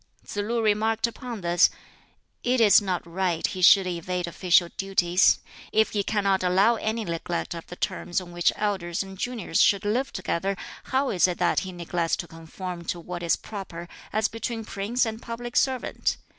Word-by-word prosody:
Tsz - - -8
lu 225 +3 0
remarked 220 +1 +2
upon 235 -2 -6
this, 175 0 +4 0.7
"It 250 +1 +2
is 215 -2 +7
not 185 -4 -2
right 175 -1 -1
he 185 - -3
should 190 +2 +7
evade 180 0 -2
official 175 0 +3
duties. 190 -2 +3 0.3
If 220 0 +3
he 205 - 0
cannot 200 -2 +1
allow 190 +5 +4
any 220 +1 -2
neglect 170 0 -3
of 170 -1 -8
the 180 - -8
terms 180 -2 -2
on 180 -2 -10
which 175 0 +2
elders 190 -4 -1
and 195 0 -10
juniors 215 -5 -1
should 200 +1 +4
live 245 +6 0
together, 190 +1 -2 0.3
how 265 +1 0
is 185 -1 +4
it 180 -2 -2
that - - +2
he 190 - -6
neglects 170 -1 -1
to 175 - -6
conform 170 +2 -7
to 175 - -3
what 175 +1 -6
is 170 -1 +2
proper 185 -5 -8 0.2
as 215 0 +2
between 225 0 -4
prince 215 +7 -1
and 220 0 -5
public 240 +1 -6
servant? 260 -2 0
195 Hz, 180 wpm, -26 LUFS, 175-220 Hz, 0.7 s, is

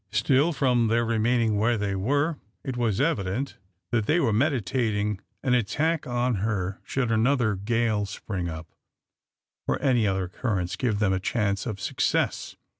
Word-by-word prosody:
Still, 130 +9 +3
from 125 -6 +2
their 115 +1 +2
remaining 115 -1 +2
where 115 +2 +2
they 100 -1 -1
were, 145 - 0 0.2
it 130 - -4
was 115 -4 0
evident 130 - -1 0.3
that 110 -3 +1
they 165 - +3
were 115 -10 +2
meditating 110 -5 0 0.2
an 130 - +2
attack 150 +8 +1
on 120 -1 0
her 100 -3 -2
should 125 -4 -1
another 115 0 +2
gale 110 +1 0
spring 95 -3 -4
up, 80 0 -8 1.0
or - - 0
any 120 -6 +2
other 95 -1 0
occurrence 90 -1 -2
give 115 -5 0
them 100 -2 +2
a 95 - 0
chance 100 0 -1
of 105 -4 -4
success. - - -1
115 Hz, 155 wpm, -26 LUFS, 100-125 Hz, 1.0 s, Still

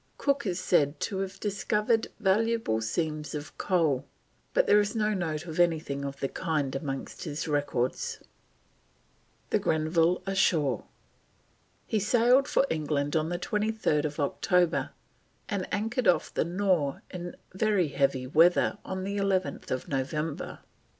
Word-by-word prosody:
Cook 280 -4 0
is 180 -1 -1
said 150 -6 +2
to 195 -3 -2
have 195 0 -4
discovered 210 +2 0
valuable 220 - +1
seams 150 +6 -2
of 150 +3 -7
coal, 155 -8 +1 0.4
but - - +3
there 210 - +6
is 205 +2 0
no 215 -1 +1
note 165 -4 -2
of 160 0 -6
anything 160 -5 +1
of 140 0 -6
the 135 - +1
kind 150 -4 -2
amongst 135 +3 -5
his 150 -1 -4
records. 145 -4 -1 1.3
THE - - +3
GRENVILLE 165 +3 +2
ASHORE. 165 - +1 1.0
He 220 - 0
sailed 245 +6 +4
for - - +3
England 150 -2 -1
on 160 0 +1
23rd 175 -5 0
October, 170 +3 +1 0.6
and 200 -4 -3
anchored 225 +4 0
off 180 - +3
the - - +1
Nore 175 -5 0
in 175 -1 -6 0.2
very 190 -4 +2
heavy 135 -2 +1
weather 165 +6 +4
on 190 0 -4
11th 195 -9 -1
November. 145 +3 -3
175 Hz, 130 wpm, -28 LUFS, 145-200 Hz, 1.3 s, there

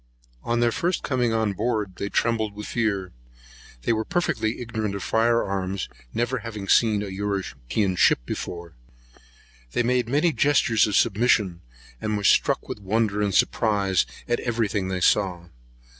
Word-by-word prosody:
On 120 - 0
their 120 0 +3
first 175 +7 -1
coming 125 -3 0
on 110 -2 0
board, 105 -3 -2
they 100 - -3
trembled 110 -3 0
for 105 - -7
fear. 100 -6 -1 0.7
They - - +2
were 110 0 -1
perfectly 115 -8 -1
ignorant 110 -4 -3
of 100 - -5
fire 115 +1 +2
arms, 95 -1 -3 0.2
never 120 - -1
having 110 -3 -7
seen 105 -1 +3
a - - -5
European 95 - -2
ship - - +5
before. 85 +4 -6 1.0
They 120 - +1
made 125 -1 +1
many 150 +5 +2
gestures 140 -8 +3
of 105 - -1
submission, 105 -5 +2 0.4
and 105 -1 -1
were 100 - -4
struck - - +3
with - - -6
wonder 105 +1 0
and 100 -1 +1
surprise 100 -5 +2 0.2
at 120 - 0
every 115 -2 0
thing 100 -1 -2
they 95 -1 -3
saw. 90 -3 +1
110 Hz, 160 wpm, -24 LUFS, 100-115 Hz, 1.0 s, ship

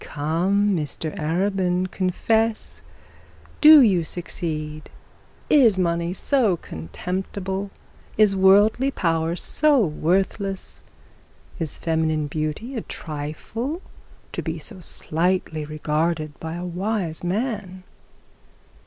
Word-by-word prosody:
'Come, 185 +7 +1
Mr 155 0 -3
Arabin, 180 +2 0
confess; 215 - 0 0.8
do 305 -1 +10
you 190 -7 +3
succeed? 155 -3 -5 0.6
Is 240 -9 +5
money 170 -1 0
so 215 -1 +2
contemptible? 190 - -4 0.5
Is 210 -2 +5
worldly 205 +7 +5
power 165 -8 0
so 290 - +2
worthless? 190 +5 -1 0.8
Is 160 -4 -3
feminine 160 -2 0
beauty 155 - -4
a 230 - -2
trifle 160 - -5 0.5
to - - -3
be 160 0 -4
so 160 +4 -8
slightly 165 -2 -1
regarded 155 +1 -1
by 160 0 -5
a 175 +1 -5
wise 180 -2 -2
man?' 195 -1 -3
180 Hz, 95 wpm, -23 LUFS, 160-200 Hz, 0.8 s, do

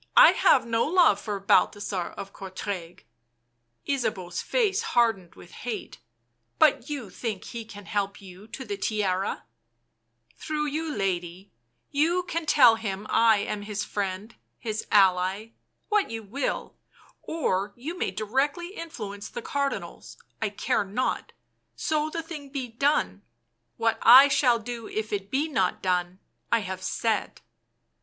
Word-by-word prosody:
I - - +10
have - - +4
no 230 0 +1
love 325 - +4
for 205 -2 -3
Balthasar 195 -2 +1
of 195 0 -7
Courtrai." 185 - -6 0.8
Ysabeau's 210 -10 -2
face 430 -4 +1
hardened 225 - +1
with 175 - -14
hate. 225 -5 -6 0.3
" 115 0 -48
But 240 - +3
you 265 -10 -5
think 220 -6 -4
he 235 -2 -7
can 205 -2 -11
help 200 -2 -2
you 195 +1 -13
to 260 +3 -8
the 205 -3 -4
Tiara 195 -2 -1 0.3
" 115 0 -50
" 115 0 -38
Through 300 -1 -2
you, 310 +2 -2
lady— 185 - -3 0.4
you 330 +5 +2
can 335 -2 -4
tell 240 -7 +7
him 205 -2 -4
I 225 -2 +5
am 205 0 -3
his 210 0 -3
friend, 200 +2 -4 0.2
his 220 -2 -4
ally, 190 +2 +3 0.4
what 420 -2 +2
you 225 -1 -5
will— 255 +7 -3 0.4
or 205 - -1
you 295 +8 -6
may - - -1
directly 280 - -1
influence 210 - -7
the 485 - -7
Cardinals, 280 -9 -3 0.2
I 220 - +1
care 205 +1 0
not, 205 +6 -2 0.4
so 310 -1 0
the 330 +1 -4
thing 305 -4 -8
be 270 -2 -4
done; 230 - 0 0.6
what 225 -1 +1
I 260 +5 +9
shall 250 -4 +4
do 230 0 -6
if 215 0 -4
it 200 -1 -3
be 280 +6 0
not 220 -12 0
done, 180 -1 0 0.3
I 230 - +3
have 190 -1 -5
said." 215 +3 -1
220 Hz, 150 wpm, -26 LUFS, 195-280 Hz, 0.8 s, I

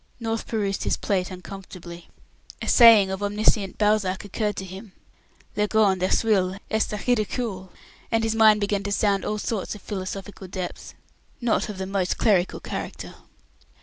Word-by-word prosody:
North 225 -1 -3
perused 200 -3 -1
his - - 0
plate 185 -3 -1
uncomfortably. 180 -2 -10 0.5
A - - -6
saying 225 -5 +7
of 190 +1 -4
omniscient 205 -1 +1
Balzac 210 -3 +1
occurred 210 +1 -2
to 190 - -5
him. 190 +2 -10 0.6
"Le 210 0 +1
grand 205 -4 +3
écueil 190 -1 +2
est 220 0 +1
le 210 - -3
ridicule," 215 -5 -1 0.4
and 225 -1 +2
his 225 0 +1
mind 220 -1 +6
began 205 0 0
to 200 0 -4
sound 200 -1 +1
all 210 - -2
sorts 210 -1 -3
of 210 - -12
philosophical 195 0 -6
depths, 185 -1 -6 0.4
not 235 -1 0
of 205 - -6
the 190 - -3
most 190 -1 -1
clerical 190 -4 +2
character. - - -6
200 Hz, 155 wpm, -24 LUFS, 190-215 Hz, 0.6 s, saying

